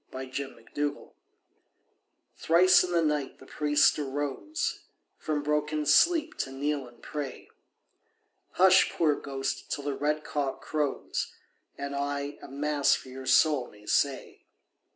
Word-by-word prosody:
THE -, -, -8 dB
PRIEST'S 130 Hz, +1 st, -7 dB
BROTHER 145 Hz, 0 st, -3 dB, 1.2 s
Thrice 180 Hz, +2 st, +5 dB
in 180 Hz, -, -4 dB
the 170 Hz, -1 st, +2 dB
night 150 Hz, -3 st, -1 dB
the 130 Hz, -, -15 dB
priest 150 Hz, +2 st, +2 dB
arose 145 Hz, -, -3 dB, 0.3 s
From 150 Hz, -2 st, -2 dB
broken 150 Hz, 0 st, 0 dB
sleep 315 Hz, -, +4 dB
to 135 Hz, -, -2 dB
kneel 140 Hz, 0 st, -2 dB
and 120 Hz, -1 st, -19 dB
pray. 145 Hz, -4 st, -6 dB, 1.0 s
"Hush, 185 Hz, 0 st, +6 dB
poor 155 Hz, -3 st, +2 dB
ghost, 135 Hz, -1 st, -4 dB
till 145 Hz, -, -3 dB
the 145 Hz, 0 st, -2 dB
red 150 Hz, +2 st, -1 dB
cock 140 Hz, -3 st, -2 dB
crows, 150 Hz, -3 st, -2 dB, 0.5 s
And 140 Hz, 0 st, -4 dB
I 140 Hz, 0 st, -3 dB
a -, -, -9 dB
Mass 145 Hz, +1 st, +1 dB
for 130 Hz, -, -9 dB
your 130 Hz, 0 st, -9 dB
soul 130 Hz, 0 st, +4 dB
may 105 Hz, 0 st, -18 dB
say." 135 Hz, +4 st, -1 dB
145 Hz, 135 wpm, -28 LUFS, 135-150 Hz, 1.2 s, Hush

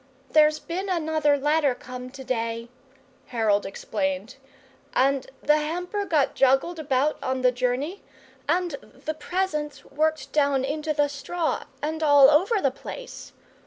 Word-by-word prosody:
"There's 305 Hz, 0 st, +5 dB
bin 370 Hz, +5 st, -4 dB
another 315 Hz, -4 st, +2 dB
letter 295 Hz, -1 st, +2 dB
come 250 Hz, 0 st, -8 dB
to 265 Hz, +1 st, -10 dB
day," 230 Hz, -2 st, -2 dB, 0.6 s
Harold 215 Hz, -4 st, +1 dB
explained, 285 Hz, +7 st, -3 dB, 0.6 s
"and 270 Hz, 0 st, +2 dB, 0.2 s
the 300 Hz, +1 st, +4 dB
hamper 355 Hz, +7 st, -2 dB
got 300 Hz, -7 st, +2 dB
joggled 270 Hz, +6 st, +2 dB
about 285 Hz, 0 st, +1 dB
on 260 Hz, 0 st, -1 dB
the 250 Hz, -, +5 dB
journey, 255 Hz, +9 st, -2 dB, 0.5 s
and 355 Hz, 0 st, +1 dB
the 310 Hz, -, -7 dB
presents 310 Hz, -3 st, -3 dB
worked 305 Hz, -1 st, -1 dB
down 280 Hz, -3 st, +2 dB
into 305 Hz, +2 st, -2 dB
the 290 Hz, -1 st, +2 dB
straw 310 Hz, +4 st, -2 dB, 0.2 s
and 315 Hz, +1 st, -2 dB
all 285 Hz, -2 st, +7 dB
over 385 Hz, +9 st, +3 dB
the 275 Hz, -7 st, +2 dB
place. 485 Hz, -, -9 dB
295 Hz, 135 wpm, -25 LUFS, 265-315 Hz, 0.6 s, all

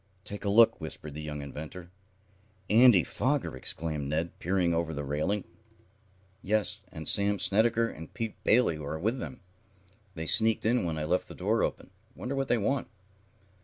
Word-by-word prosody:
"Take 105 Hz, 0 st, -7 dB
a 100 Hz, -, -1 dB
look," 115 Hz, +3 st, +5 dB
whispered 75 Hz, -1 st, -7 dB
the 75 Hz, -, -7 dB
young 75 Hz, -1 st, -6 dB
inventor. 80 Hz, +5 st, -9 dB, 0.8 s
"Andy 115 Hz, -5 st, +7 dB
Foger!" -, -, -1 dB
exclaimed 75 Hz, +2 st, -4 dB
Ned, 80 Hz, +3 st, -3 dB
peering 90 Hz, -1 st, +1 dB
over 85 Hz, -1 st, -1 dB
the 75 Hz, -, -4 dB
railing. 75 Hz, +9 st, -1 dB, 1.0 s
"Yes, 105 Hz, +1 st, 0 dB
and 80 Hz, -1 st, -5 dB
Sam 100 Hz, 0 st, +5 dB
Snedecker 115 Hz, +4 st, +2 dB
and 80 Hz, -7 st, -10 dB
Pete 115 Hz, -2 st, -6 dB
Bailey 110 Hz, -9 st, +3 dB
are 75 Hz, +1 st, -5 dB
with 110 Hz, +9 st, -1 dB
him. 125 Hz, -, -8 dB, 0.7 s
They 80 Hz, -1 st, -4 dB
sneaked 110 Hz, +6 st, +4 dB
in 120 Hz, -2 st, +2 dB
when 80 Hz, -2 st, -2 dB
I 75 Hz, -, -3 dB
left 85 Hz, +4 st, 0 dB
the -, -, -11 dB
door -, -, 0 dB
open. -, -, -3 dB, 0.2 s
Wonder 130 Hz, -, -5 dB
what 135 Hz, -1 st, -1 dB
they 120 Hz, -, +2 dB
want?" 135 Hz, +6 st, -1 dB
90 Hz, 165 wpm, -29 LUFS, 80-110 Hz, 1.0 s, Andy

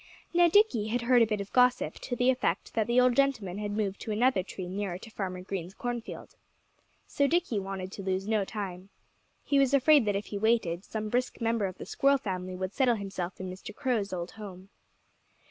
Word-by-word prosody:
Now, 345 Hz, 0 st, +6 dB
Dickie 335 Hz, -, +3 dB
had 235 Hz, +2 st, -1 dB
heard 245 Hz, 0 st, +5 dB
a 230 Hz, -, +5 dB
bit 210 Hz, -1 st, -1 dB
of 200 Hz, -, -9 dB
gossip, 250 Hz, 0 st, +3 dB
to 245 Hz, -, -4 dB
the 245 Hz, +2 st, +3 dB
effect 255 Hz, -, -1 dB
that 220 Hz, -1 st, 0 dB
the 240 Hz, +1 st, +3 dB
old 250 Hz, -1 st, +4 dB
gentleman 225 Hz, -9 st, +1 dB
had 210 Hz, -1 st, -3 dB
moved 200 Hz, -2 st, -1 dB
to -, -, -6 dB
another 235 Hz, -1 st, +3 dB
tree 185 Hz, 0 st, -7 dB
nearer 190 Hz, -1 st, -3 dB
to 225 Hz, +4 st, -12 dB
Farmer 185 Hz, -3 st, -4 dB
Green's 185 Hz, -1 st, -5 dB
cornfield. 240 Hz, -1 st, -6 dB, 0.7 s
So 280 Hz, -1 st, +1 dB
Dickie 325 Hz, -, +1 dB
wanted 190 Hz, -1 st, -5 dB
to 200 Hz, -, -7 dB
lose 190 Hz, +1 st, -2 dB
no 215 Hz, -2 st, +2 dB
time. 190 Hz, -2 st, -6 dB, 0.5 s
He 280 Hz, -1 st, +2 dB
was 275 Hz, 0 st, +4 dB
afraid 280 Hz, -1 st, +5 dB
that 205 Hz, -1 st, +1 dB
if 200 Hz, -, -2 dB
he 205 Hz, -, -5 dB
waited, 200 Hz, -6 st, +1 dB
some 215 Hz, 0 st, -4 dB
brisk 250 Hz, +3 st, -1 dB
member 230 Hz, -3 st, +1 dB
of 185 Hz, -, -8 dB
the -, -, -7 dB
Squirrel 275 Hz, 0 st, +3 dB
family 185 Hz, -5 st, -4 dB
would 185 Hz, +2 st, -4 dB
settle 255 Hz, -3 st, +3 dB
himself 195 Hz, -3 st, -5 dB
in 185 Hz, -, -5 dB
Mr. 185 Hz, +2 st, -9 dB
Crow's 240 Hz, -7 st, -1 dB
old 175 Hz, -1 st, -4 dB
home. 195 Hz, -3 st, -10 dB
210 Hz, 210 wpm, -29 LUFS, 190-250 Hz, 0.7 s, Now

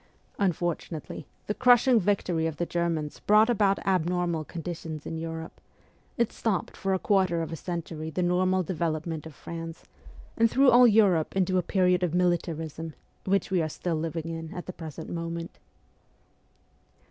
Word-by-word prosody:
Unfortunately, 175 Hz, -5 st, -2 dB, 0.2 s
the 210 Hz, -, -1 dB
crush 245 Hz, +2 st, +5 dB
ing 245 Hz, -3 st, +6 dB
victory 180 Hz, -4 st, 0 dB
of 160 Hz, -2 st, -5 dB
the 175 Hz, -, -1 dB
Germans 165 Hz, -4 st, -2 dB
brought 215 Hz, +3 st, +5 dB
about 200 Hz, -3 st, +3 dB
abnormal 175 Hz, -3 st, +1 dB
conditions 160 Hz, -2 st, -6 dB
in 160 Hz, -, -4 dB
Europe; 165 Hz, 0 st, -6 dB, 0.6 s
it 235 Hz, -2 st, +1 dB
stopped 210 Hz, -6 st, -2 dB
for 195 Hz, -1 st, 0 dB
a -, -, +1 dB
quarter 185 Hz, -4 st, +2 dB
of 160 Hz, -, -6 dB
a -, -, -3 dB
century 165 Hz, -1 st, -5 dB
the 180 Hz, +3 st, -1 dB
normal 185 Hz, +1 st, +2 dB
development 160 Hz, -2 st, -3 dB
of 155 Hz, -, -12 dB
France, 165 Hz, -1 st, -7 dB, 0.5 s
and 230 Hz, 0 st, +4 dB
threw 265 Hz, +2 st, +5 dB
all 245 Hz, +1 st, +8 dB
Europe 200 Hz, -8 st, +3 dB
into 185 Hz, -1 st, +2 dB
a -, -, +2 dB
period 180 Hz, -1 st, +2 dB
of 175 Hz, -2 st, 0 dB
militarism, 165 Hz, -3 st, -1 dB, 0.3 s
which 195 Hz, 0 st, +1 dB
we 185 Hz, -2 st, +3 dB
are 155 Hz, -, -1 dB
still 175 Hz, +3 st, -3 dB
living 165 Hz, +1 st, -3 dB
in 165 Hz, 0 st, -5 dB
at 175 Hz, -, -6 dB
the 185 Hz, -, -6 dB
present 160 Hz, -1 st, -8 dB
moment. 170 Hz, 0 st, -5 dB
175 Hz, 160 wpm, -27 LUFS, 160-190 Hz, 0.6 s, all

